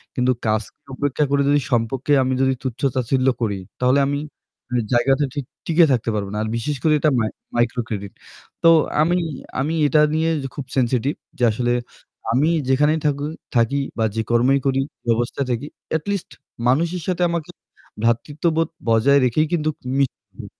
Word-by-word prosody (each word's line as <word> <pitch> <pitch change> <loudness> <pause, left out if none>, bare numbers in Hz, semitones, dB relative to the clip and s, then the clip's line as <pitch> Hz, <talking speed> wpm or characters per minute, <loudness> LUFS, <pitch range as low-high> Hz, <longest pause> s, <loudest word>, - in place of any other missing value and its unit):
কিন্তু 125 0 +2 0.2
কাজকে 110 -1 -1 0.2
উপেক্ষা 145 +2 0
করে 140 0 +3
যদি 145 0 +4
সম্পর্কে 120 +4 0
আমি 130 0 0
যদি 130 0 +3
তুচ্ছ-তাচ্ছিল্য 130 0 0
করি 105 -4 0 0.2
তাহলে 125 +2 +3
আমি 140 0 -1 0.5
এ - - -1 0.2
জায়গাতে 135 +4 +3
ঠিক 145 -3 -4 0.2
টিকে 165 +1 +5
থাকতে 120 -3 +1
পারব 100 -2 -2
না। - - -3
আর - - -3
বিশেষ 145 +6 -2
করে 155 - +4
এটা 155 - +3
মাই-মাইক্রোক্রেডিট। 110 -2 -2 0.5
তো 165 - +8 0.3
আমি, 175 +3 +3 0.4
আমি 145 +5 0
এটা 150 +2 +4
নিয়ে 160 +1 +1 0.2
খুব 145 - -6
sensitive 130 +3 +1 0.2
যে 125 - -2
আসলে 120 +2 0 0.6
আমি 135 +7 +3 0.2
যেখানেই 150 +4 +3
থাকু 145 -1 0 0.3
থাকি 120 +4 +2 0.2
বা 110 - +2
যে 110 - +1
কর্মই 125 +4 +4
করি, 135 -1 +2 0.3
ব্যবস্থাই 120 +4 0
থাকি 120 +4 -2 0.3
at 155 - -11
least 200 -3 -3 0.4
মানুষের 170 +7 +1
সাথে 180 -1 -1
আমাকে 170 -2 -3 0.5
ভ্রাতৃত্ববোধ 155 +7 +1 0.2
বজায় 115 +5 +5
রেখেই 155 +6 +2
কিন্তু 155 -2 +1 0.3
মিশবো। 140 -2 -3
135 Hz, 155 wpm, -21 LUFS, 120-150 Hz, 0.6 s, তো